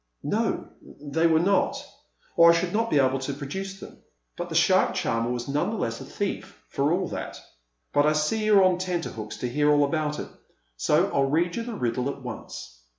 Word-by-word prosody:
"No, - - -1
they 150 +3 -1
were 160 -1 +4
not, 195 +3 +2 0.6
or 170 0 +7
I 170 - +6
should 175 +1 -1
not 225 +2 +1
be - - +2
able 135 -1 +3
to 135 +1 -4
produce 190 +8 -6
them. - - -12 0.4
But - - -5
the - - -5
shark - - +3
charmer 115 +1 0
was 120 -1 -3
none 145 +6 0
the 225 - -3
less 115 - -3
a - - -8
thief, 195 +4 -5
for 140 +2 0
all 180 +1 0
that. - - -6 0.5
But 145 +1 +4
I 155 - +4
see 155 +9 0
you're 205 -2 +6
on 185 -1 +3
tenterhooks 170 -12 -4
to 125 - -3
hear 145 +4 +1
all 145 -1 +5
about 150 0 -1
it, - - -6 0.5
so - - +2
I'll 135 -1 +2
read 170 +4 +1
you - - -2
the 230 -1 -5
riddle 125 - -1
at 140 - -6
once." 110 - -8
150 Hz, 210 wpm, -26 LUFS, 135-185 Hz, 0.6 s, or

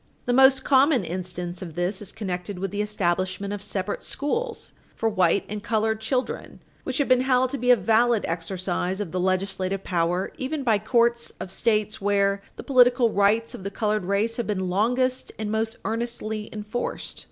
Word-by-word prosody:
The 245 - +1
most 265 +1 +6
common 275 -3 +4
instance 180 0 -5
of 170 -4 -7
this 180 +3 -1
is 205 - -7
connected 185 -2 -4
with 195 0 -3
the 205 - -1
establishment 190 -1 -1
of 205 - -5
separate 205 0 -3
schools 460 +12 -3 0.2
for 225 - 0
white 190 -3 +2
and 210 0 -5
colored 220 0 0
children, 250 +3 -2 0.2
which 260 - -3
has 285 - +1
been 255 -1 +4
held 255 -1 +2
to 280 - -3
be 250 +1 0
a 250 - +9
valid 225 +2 +2
exercise 180 +2 -2
of 200 -6 -4
the 185 - -2
legislative 190 +1 -1
power 175 +1 0
even 280 +2 -2
by 225 -5 +3
courts 235 +2 +2
of 185 - -5
States 215 0 0
where 200 0 +2
the - - -8
political 245 -3 +4
rights 210 +3 +2
of - - -8
the 200 - -3
colored 210 -1 -1
race 205 +4 0
have 240 - -2
been 190 -3 -1
longest 250 +6 +1
and 215 -1 -3
most 220 +1 -1
earnestly 220 -2 -2
enforced. 215 +3 -4
210 Hz, 180 wpm, -25 LUFS, 190-240 Hz, 0.2 s, a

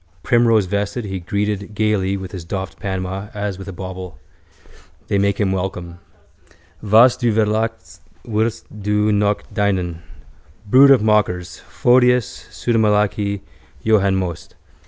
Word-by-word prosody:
Primrosevested 110 -2 +1
he 95 -2 -5
greeted 105 +2 -3
gaily 100 -2 0
with 95 -2 -8
his 90 -3 -7
doffed 95 +2 -6
Panama 95 0 -4
as 100 -2 -4
with 95 - -9
a - - -5
bauble. 95 0 -8 0.9
They 100 - +1
make 100 0 0
him 100 -3 +1
welcome. 90 -2 -4 0.8
Was 110 +4 +5
Du 120 -2 0
verlachst 110 +1 -1 0.3
wirst 110 0 -1 0.2
Du 105 +1 +1
noch 105 0 +1
dienen. 95 -5 -1 0.7
Brood 130 +7 +6
of 135 -5 +5
mockers: 90 -5 0
Photius, 125 -1 +1
pseudomalachi, 105 -3 0 0.4
Johann 100 -3 +3
Most. 90 -3 -4
100 Hz, 120 wpm, -19 LUFS, 95-110 Hz, 0.9 s, Brood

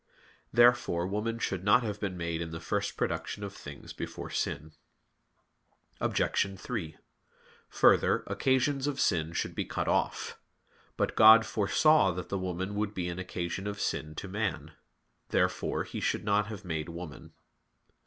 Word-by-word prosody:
Therefore 120 -7 +4
woman 105 +4 -2
should 95 -5 -2
not 115 +5 +5
have 105 -2 -3
been 95 -3 -3
made 85 -1 -2
in 85 - -4
the 80 0 -6
first - - -2
production 105 - -2
of 100 -1 -5
things 70 -7 -10
before - - -6
sin. 80 +2 -2 1.3
Obj. 95 -1 0
3: 95 -11 -5 0.7
Further, - - +4
occasions 135 +1 +1
of 140 -2 -2
sin 80 -4 +1
should - - -2
be - - -2
cut - - -3
off. - - -1 0.6
But - - 0
God 110 +1 +9
foresaw 115 +5 +4
that 90 +1 -6
the 100 - -1
woman 95 +1 -3
would 105 0 -2
be 90 -1 -2
an 85 +1 -5
occasion 90 +1 -4
of 105 0 -4
sin 75 0 -2
to 100 - -6
man. 95 -7 -3 0.6
Therefore - - 0
He - - -6
should - - -1
not 105 0 +2
have 105 -3 -8
made 80 -2 -3
woman. 85 -2 -9
100 Hz, 155 wpm, -30 LUFS, 85-110 Hz, 1.3 s, God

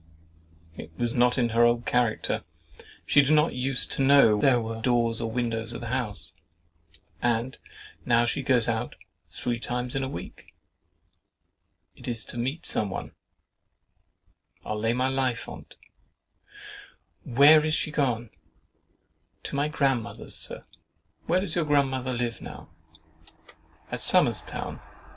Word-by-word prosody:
It 80 - -9
was 120 +2 -1
not 125 +1 +3
in 120 -2 +2
her 115 +1 +3
old 120 0 +2
character. 120 -3 0 0.6
She 145 - +5
did 140 +2 +2
not 150 +2 +3
use 125 +1 +1
to - - -3
know 135 -6 +6
there 130 -3 +4
were 115 0 -5
doors 120 -1 +1
or 115 - -2
windows 115 -1 -2
in - - -6
the 120 - -5
house—and 85 0 -5 0.4
now 120 -1 +3
she 120 - -1
goes 125 -4 +2
out 115 +1 -2 0.3
three 120 -1 -3
times 125 +1 -3
in 135 - 0
a 130 - -3
week. 90 - -10 1.4
It - - -12
is 115 -3 -1
to 120 - -6
meet 135 +7 -3
some 105 - -1
one, - - -6 1.5
I'll 110 - -3
lay 115 +2 +1
my 125 +2 +1
life 130 -3 -1
on't. - - -11 1.5
"Where 145 +5 +6
is 155 0 +1
she 155 - -1
gone?"—"To 125 -1 -6
my 145 +1 +1
grandmother's, 135 -6 -1
Sir." - - -4 0.6
"Where 180 +2 +2
does 200 - -2
your 170 -3 +1
grandmother 135 -3 +1
live 120 -2 -3
now?"—"At 80 0 -13
Somers' - - +3
Town." - - -6
120 Hz, 135 wpm, -26 LUFS, 115-135 Hz, 1.5 s, know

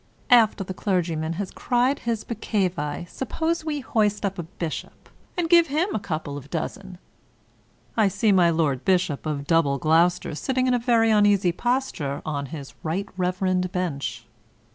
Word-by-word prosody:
After 225 -4 +5
the 185 - -6
clergyman 165 -5 -1
has 190 +2 -4
cried 250 +3 +1
his 230 -2 -2
peccavi, 180 -8 -2
suppose 320 - -2
we 300 -2 -2
hoist 210 -5 0
up 195 -1 -3
a - - 0
bishop, 165 -1 -7 0.3
and 345 -2 +1
give 340 0 +6
him 325 +7 0
a - - 0
couple 155 -6 -4
of 145 0 -10
dozen 180 +3 -5 1.0
I 220 - +4
(I - - +5
see 210 +3 +2
my 180 -3 +5
Lord 155 -6 0
Bishop 180 -6 +1
of 145 -2 -3
Double 155 -4 +2
Gloucester 165 +5 +2
sitting 255 - -1
in 255 - +2
a 245 - +2
very 230 -2 +3
uneasy 205 -4 +4
posture 210 - -2
on 140 -2 -3
his 140 -1 -8
right 180 +6 -2
reverend 185 0 0
bench.) 140 -11 -3
185 Hz, 165 wpm, -24 LUFS, 160-230 Hz, 1.0 s, give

